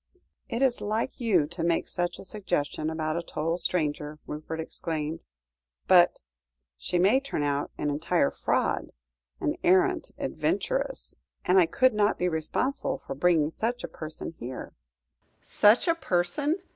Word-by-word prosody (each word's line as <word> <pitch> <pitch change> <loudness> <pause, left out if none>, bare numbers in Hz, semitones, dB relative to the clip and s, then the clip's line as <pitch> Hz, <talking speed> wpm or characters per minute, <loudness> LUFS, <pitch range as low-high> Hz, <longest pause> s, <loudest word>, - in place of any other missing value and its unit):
"It 235 +4 0
is 255 -3 +2
like 220 +4 -2
you 200 - +3
to 170 +2 -5
make 170 0 +1
such 175 0 -2
a - - -10
suggestion 175 -7 -2
about 160 0 -2
a - - -1
total 165 +1 -2
stranger," 150 -3 0
Rupert 155 +2 -6
exclaimed, 160 -1 -3 0.7
"but - - +5 0.5
she 65 - -2
may 200 +9 +5
turn 275 - -3
out 145 0 0
an 150 - -1
entire 160 +1 +1
fraud - - -1 0.5
an - - -1
arrant 190 - +3
adventuress - - -2 0.3
and 185 +1 +5
I 175 - +5
could 255 +8 +3
not 210 0 +2
be 180 - +1
responsible 180 - -1
for - - -7
bringing 160 +1 +2
such 240 +7 -2
a - - -3
person 155 0 -7
here." 125 +2 -7 0.7
"Such 210 - +4
a 335 - +5
person! 285 - 0
175 Hz, 145 wpm, -27 LUFS, 155-215 Hz, 0.7 s, but